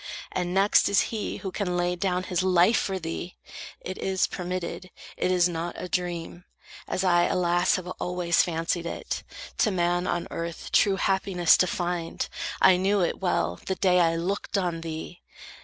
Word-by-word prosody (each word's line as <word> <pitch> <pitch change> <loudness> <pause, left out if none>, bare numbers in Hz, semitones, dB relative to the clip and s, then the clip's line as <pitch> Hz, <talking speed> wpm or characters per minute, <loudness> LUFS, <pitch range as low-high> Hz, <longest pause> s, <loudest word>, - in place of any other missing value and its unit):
And 180 -1 -2
next 195 +2 +4
Is 200 - +4
he, 215 - -3
who 190 - -5
can 180 -2 -2
lay 175 0 0
down 180 0 -1
his 185 -1 -1
life 185 +4 +4
for 195 -1 -2
thee! 170 +1 -6 0.4
It 185 - -6
is 190 -1 +1
permitted, 180 0 -5 0.3
it - - 0
is 180 -1 +4
not 170 0 -4
a 180 - -5
dream, 175 -1 -3 0.4
As 185 - -1
I, 175 -2 +4
alas, 175 0 +2
have 185 - -4
always 180 -1 +1
fancied 170 0 -1
it, - - -4 0.4
To 220 - +4
man, 175 -1 0
on 175 0 -1
earth 170 0 -5
true 200 -2 +4
happiness 190 -3 +3
to 185 - +3
find. 175 -2 -2 0.3
I 185 -1 +6
knew 195 +2 +2
it 175 - 0
well, 130 - 0
the 190 - 0
day 180 -2 +3
I 165 -1 +3
looked 195 +5 -2
on 175 -4 -1
thee. 165 +2 -7
180 Hz, 175 wpm, -26 LUFS, 175-185 Hz, 0.4 s, I